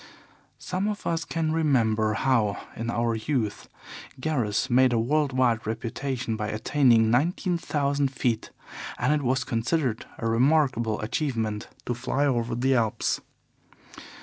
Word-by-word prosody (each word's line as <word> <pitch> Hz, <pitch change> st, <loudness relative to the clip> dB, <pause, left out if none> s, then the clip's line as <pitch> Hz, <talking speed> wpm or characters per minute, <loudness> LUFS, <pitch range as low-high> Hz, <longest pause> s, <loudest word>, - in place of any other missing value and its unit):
Some 185 Hz, +3 st, -2 dB
of 210 Hz, -1 st, -4 dB
us 165 Hz, -1 st, 0 dB
can 160 Hz, -1 st, -1 dB
remember 115 Hz, -9 st, +2 dB
how, 115 Hz, -6 st, +1 dB, 0.2 s
in 115 Hz, +1 st, -4 dB
our 115 Hz, 0 st, 0 dB
youth, 110 Hz, -1 st, -2 dB, 0.5 s
Garros 125 Hz, -9 st, 0 dB
made 130 Hz, 0 st, +4 dB
a 115 Hz, -, +2 dB
world 145 Hz, +4 st, +1 dB
wide 120 Hz, -4 st, +1 dB
reputation 120 Hz, +2 st, -3 dB
by 105 Hz, -1 st, -3 dB
attaining 115 Hz, 0 st, +3 dB
nineteen 170 Hz, -, +1 dB
thousand 140 Hz, -2 st, 0 dB
feet, 120 Hz, -4 st, -1 dB, 0.5 s
and 135 Hz, +5 st, +2 dB
it 150 Hz, -, +1 dB
was 130 Hz, 0 st, +1 dB
considered 120 Hz, +1 st, -1 dB
a -, -, -5 dB
remarkable 120 Hz, -2 st, +2 dB
achievement 110 Hz, -3 st, -2 dB, 0.2 s
to 120 Hz, -, -1 dB
fly 130 Hz, +4 st, -1 dB
over 120 Hz, -4 st, 0 dB
the 130 Hz, +3 st, +2 dB
Alps. 115 Hz, -4 st, 0 dB
125 Hz, 135 wpm, -26 LUFS, 115-145 Hz, 0.5 s, made